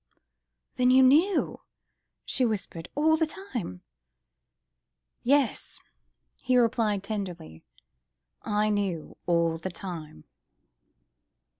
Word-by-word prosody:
"Then 250 0 +4
you 260 +1 +7
knew?.. 320 +9 +3 0.3
." - - -55
she 260 - 0
whispered, 195 -7 -2
"all 315 +2 +4
the 320 0 +1
time.. 240 - -6 0.7
." - - -57 0.6
"Yes!" 275 0 +1 0.6
he 255 -1 +2
replied 225 -4 +2
tenderly, 185 - -5 0.8
"I 210 +1 0
knew... 195 -6 -2
all 170 -1 +2
the 185 - -4
time. 165 - -8
210 Hz, 100 wpm, -27 LUFS, 175-255 Hz, 0.8 s, you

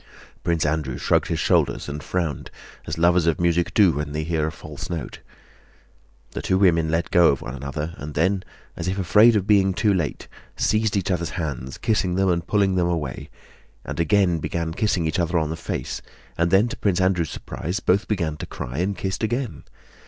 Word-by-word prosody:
Prince 85 -3 +1
Andrew 75 -5 -1
shrugged - - +1
his - - -1
shoulders - - +1
and 75 +1 -5
frowned, 85 -2 -3 0.4
as - - -3
lovers 85 0 +3
of 85 - +2
music 85 0 +1
do 100 -5 +5
when 75 0 -4
they 75 0 -2
hear 80 -1 0
a - - -3
false 75 -1 -9
note. 85 -4 -5 1.1
The - - -5
two 95 - +1
women 85 -5 +3
let 80 +1 -1
go 85 -1 +6
of 70 - -3
one - - -6
another, 70 +4 -5
and 75 +1 -7
then, 95 +4 +1 0.3
as 85 - -5
if 95 +1 -1
afraid 105 +5 +5
of 100 -3 +1
being 100 -2 +3
too 105 0 +2
late, 85 -6 -2 0.3
seized 110 0 +1
each 95 0 -1
other's 85 -2 -1
hands, 65 -6 -4
kissing 95 -5 0
them 95 0 +2
and 85 -1 0
pulling 100 -2 +2
them 90 -1 +2
away, 80 -6 -3 0.6
and - - -5
again 90 0 +3
began 80 +1 -3
kissing 95 -3 0
each 80 +2 -1
other 85 0 +1
on 80 -1 0
the - - -2
face, 85 - -4 0.3
and 85 +1 +1
then 95 +5 +4
to 140 - -6
Prince 95 -3 +1
Andrew's 95 -4 +1
surprise 90 +7 -4
both 100 0 +1
began 85 -8 -1
to - - -6
cry 60 +5 -5
and 95 +2 -1
kissed 95 +1 -3
again. 115 - -2
85 Hz, 200 wpm, -23 LUFS, 80-95 Hz, 1.1 s, go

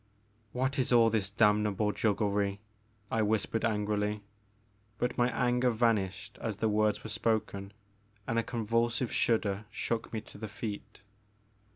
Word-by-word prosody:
What 130 +4 -1
is 125 - +1
all 115 -2 +6
this 105 -3 0
damnable 105 0 +2
jugglery!'* 100 -2 0 0.5
I 115 - +2
whispered 110 +1 0
angrily, 105 -1 0 0.7
but 125 0 -1
my 120 0 +3
anger 125 0 +2
vanished 110 -6 0
as 110 -3 -3
the 110 - +1
words 105 0 +1
were 110 - -6
spoken, 110 -3 -1 0.5
and 115 - 0
a - - 0
convulsive 115 +1 0
shudder 105 -3 +1
shook 115 0 -3
me 110 - -2
to 105 - -13
the 110 - -4
feet. 105 0 -7
110 Hz, 140 wpm, -31 LUFS, 105-115 Hz, 0.7 s, all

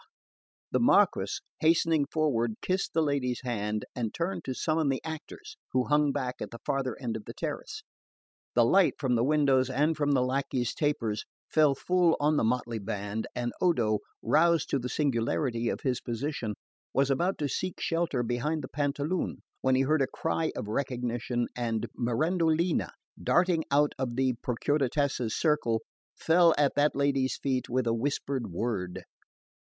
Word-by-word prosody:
The - - +2
Marquess, - - +3 0.2
hastening 160 -2 +3
forward, 120 -8 0
kissed 185 +1 -1
the 160 - +4
lady's 135 -4 -1
hand, 105 -3 -2
and 115 -4 -2
turned 175 +3 -3
to 130 - -3
summon 155 0 +1
the 135 - 0
actors, 290 - -8 0.2
who 130 -1 +3
hung 150 -1 +3
back 130 -3 -3
at - - -4
the 115 - -9
farther 135 -3 -1
end 120 -4 -3
of 110 - -6
the - - -8
terrace. - - -5 0.7
The 120 -1 +5
light 185 +8 +4
from 130 -4 0
the 115 -1 +2
windows 135 -2 +3
and 150 +5 +1
from 145 -1 +1
the 130 -2 +3
lacquey's 130 -2 -1
tapers 115 -8 -1 0.3
fell 150 -3 +4
full 180 +2 +2
on 150 +1 +2
the - - +2
motley 120 0 0
band, 105 +1 -4
and 120 -1 -2
Odo, 115 - +2 0.2
roused 165 +7 +3
to 140 - +2
the 125 0 -4
singularity 120 -3 0
of - - -3
his 125 -3 -1
position, 120 -3 -3 0.4
was 135 +1 +3
about 175 +8 +1
to 145 - -1
seek 185 +5 -3
shelter 165 -7 0
behind 135 +6 -1
the - - -6
Pantaloon 145 +4 -2 0.2
when 130 0 +3
he 130 - +3
heard 150 +2 +2
a 135 - +2
cry 160 +2 -1
of 105 - -4
recognition, 120 0 -2
and 115 -3 -1
Mirandolina, 160 +7 +1 0.3
darting 175 -3 +2
out 145 +1 +3
of 125 -3 -2
the 130 0 +2
Procuratessa's 135 -2 0
circle, 135 -8 +1 0.3
fell 165 0 +4
at 145 -1 +3
that 145 +1 +2
lady's 140 -2 +1
feet 130 -2 -1
with 125 0 0
a 115 - +2
whispered 135 +1 -2
word. 90 -2 -3
135 Hz, 165 wpm, -29 LUFS, 120-155 Hz, 0.7 s, The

